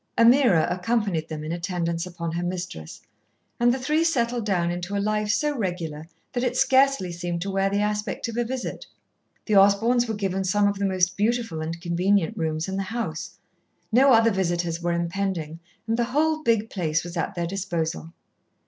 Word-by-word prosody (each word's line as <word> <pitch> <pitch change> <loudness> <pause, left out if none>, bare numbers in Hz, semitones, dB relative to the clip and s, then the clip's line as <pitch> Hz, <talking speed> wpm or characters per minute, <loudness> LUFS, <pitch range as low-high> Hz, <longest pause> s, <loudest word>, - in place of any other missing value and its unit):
Ameerah 235 - +5
accompanied 185 -3 -1
them 155 -1 -5
in 155 - -4
attendance 170 -1 -2
upon 170 -2 -5
her 170 +1 -2
mistress, 175 - -5 0.6
and 240 0 +4
the 255 - 0
three 305 +5 +1
settled 240 -8 0
down 175 -4 +1
into 175 +3 -4
a - - +1
life 210 +1 0
so 295 +7 +1
regular 170 - -4 0.3
that 245 -1 -1
it 250 0 0
scarcely 265 -9 +3
seemed 175 0 -3
to 195 - -3
wear 195 0 +1
the 200 +1 0
aspect 210 +1 -2
of 230 - -6
a 240 - +1
visit. 255 +2 -5 0.6
The 215 - +1
Osborns 225 +5 +4
were 220 - -2
given 195 -2 -1
some 205 +2 +2
of 200 -1 -1
the 200 - +1
most 185 -1 +1
beautiful 225 -6 0
and 165 +1 -4
convenient 180 +1 +1
rooms 160 0 -2
in 190 0 -3
the - - 0
house. 175 -6 -4 0.5
No 265 +4 +6
other 230 -1 +5
visitors 175 -3 -1
were 175 0 0
impending 170 -2 -2 0.3
and 225 +1 0
the 240 - +1
whole 310 +5 +1
big 225 -5 +1
place 165 -4 -1
was 175 +1 -8
at 175 +3 -2
their 170 -1 -1
disposal. 170 -3 -3
195 Hz, 185 wpm, -25 LUFS, 170-230 Hz, 0.6 s, No